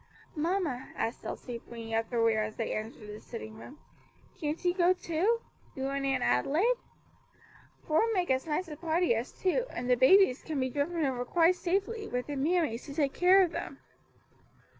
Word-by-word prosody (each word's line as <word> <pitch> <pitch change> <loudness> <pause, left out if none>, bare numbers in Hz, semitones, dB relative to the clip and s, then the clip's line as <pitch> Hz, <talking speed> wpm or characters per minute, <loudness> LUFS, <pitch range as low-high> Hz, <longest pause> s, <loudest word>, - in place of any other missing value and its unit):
"Mamma," 320 -5 -1
asked 230 - -3
Elsie, 240 -2 -6
bringing 230 -1 -7
up 225 0 0
the 240 - -2
rear 225 -1 +3
as 215 0 -4
they 225 - -2
entered 215 0 -6
the 210 0 -8
sitting 220 -2 -8
room, 280 - -11 0.6
"can't 305 +2 -3
you 355 - +3
go, 360 0 +4
too 370 +7 0 0.3
you 265 0 -2
and 275 0 -1
Aunt 270 - +1
Adelaide? 285 - +2 1.1
Four 320 +9 +2
make 365 -8 +1
as 260 +4 0
nice 320 +4 -1
a 305 - -7
party 330 -1 +1
as 230 +3 -3
two, 430 +7 0
and 245 - -5
the 250 - +5
babies 265 +2 +5
can 310 -3 -3
be 260 -1 -1
driven 305 +4 0
over 255 -2 -1
quite 335 +7 +3
safely, 405 +5 -1
with 250 0 -2
their 290 - -5
mammies, 295 -4 0
to 280 - -8
take 285 -3 +1
care 375 +2 +6
of 350 - 0
them." - - -5
295 Hz, 185 wpm, -30 LUFS, 245-355 Hz, 1.1 s, care